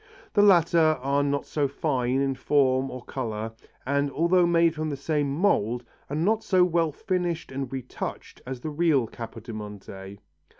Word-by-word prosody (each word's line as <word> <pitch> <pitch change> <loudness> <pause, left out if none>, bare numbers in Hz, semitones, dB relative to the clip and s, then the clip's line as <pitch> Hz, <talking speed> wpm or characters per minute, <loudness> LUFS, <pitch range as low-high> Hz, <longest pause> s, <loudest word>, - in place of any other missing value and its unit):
The 205 - +5
latter 170 -5 +5
are 140 +2 +1
not 140 0 0
so 145 -2 0
fine 135 -3 0
in 135 -1 +1
form 135 -1 +2
or 130 -1 -7
colour, 110 -4 -4 0.3
and 140 +2 +1
although 170 +4 +3
made 170 -1 +4
from 155 -1 -3
the 140 - -3
same 145 0 -1
mould 125 - +1 0.3
are 140 - -3
not 210 +8 +1
so 185 -2 +4
well 170 -2 +1
finished 175 0 -2
and 135 -1 -4
retouched 130 -2 -6
as 130 -1 -5
the 155 - -4
real 150 -5 +2
Capodimonte. 105 -4 -8
140 Hz, 160 wpm, -26 LUFS, 130-165 Hz, 0.3 s, The